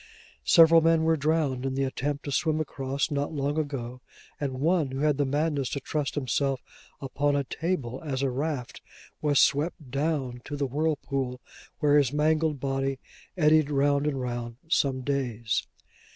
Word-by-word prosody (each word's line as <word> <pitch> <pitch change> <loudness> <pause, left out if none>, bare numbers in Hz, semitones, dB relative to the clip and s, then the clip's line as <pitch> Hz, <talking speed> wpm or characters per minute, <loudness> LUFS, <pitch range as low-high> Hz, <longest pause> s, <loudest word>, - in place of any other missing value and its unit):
Several 165 -1 +7
men 165 0 +3
were 160 0 +3
drowned 150 -4 0
in 135 0 -2
the 135 - 0
attempt 140 +2 -3
to 140 - -3
swim 155 +2 +1
across, 140 -1 -2
not 145 0 -1
long 145 +1 -1
ago; 130 -4 -4 0.4
and 140 -3 -2
one, 160 -1 +2
who 135 +1 -4
had 150 -2 +2
the 145 -1 +1
madness 145 -1 0
to 140 - -3
trust 145 0 -3
himself 135 -1 -1 0.4
upon 140 +1 0
a 140 - +1
table 135 -4 -3
as 140 -3 -2
a 135 - +1
raft, 135 -2 -3 0.4
was 145 -2 +3
swept 150 -1 +1
down 135 -4 -1
to 145 - -5
the 140 - 0
whirlpool, 135 -3 -2 0.4
where 145 0 +5
his 135 -3 +1
mangled 155 0 +1
body 135 0 -1 0.4
eddied 155 -2 +4
round 145 0 +2
and 140 -3 -1
round 120 -2 -4
some 135 -5 +1
days. 125 -5 -1
140 Hz, 165 wpm, -27 LUFS, 135-150 Hz, 0.4 s, Several